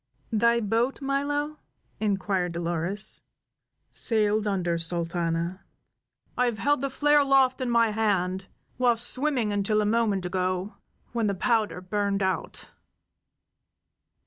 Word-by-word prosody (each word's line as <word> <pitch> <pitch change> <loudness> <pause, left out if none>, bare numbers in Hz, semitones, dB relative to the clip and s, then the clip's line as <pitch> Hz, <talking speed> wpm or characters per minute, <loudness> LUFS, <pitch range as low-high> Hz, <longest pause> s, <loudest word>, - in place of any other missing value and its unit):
"Thy 235 +2 +3
boat, 230 +4 0
Milo?" 290 +2 -2 0.4
inquired 195 -4 -1
Dolores. 170 +4 0 0.7
"Sailed 215 -1 +2
under, 175 -4 0
Sultana. 170 +1 -1 0.7
I 250 - +2
have 235 -3 -2
held 290 +2 +1
the 275 - -1
flare 295 +2 +3
aloft 270 -2 +3
in 255 - -1
my 230 -2 +3
hand 190 -3 0 0.3
while 245 -2 +3
swimming 250 -1 +1
until 205 +1 +1
a 210 - +1
moment 210 -4 +1
ago, 185 +2 -2 0.4
when 230 -2 0
the 200 - 0
powder 215 -2 0
burned 200 +1 -1
out." 190 -4 -3
210 Hz, 120 wpm, -26 LUFS, 185-240 Hz, 0.7 s, Thy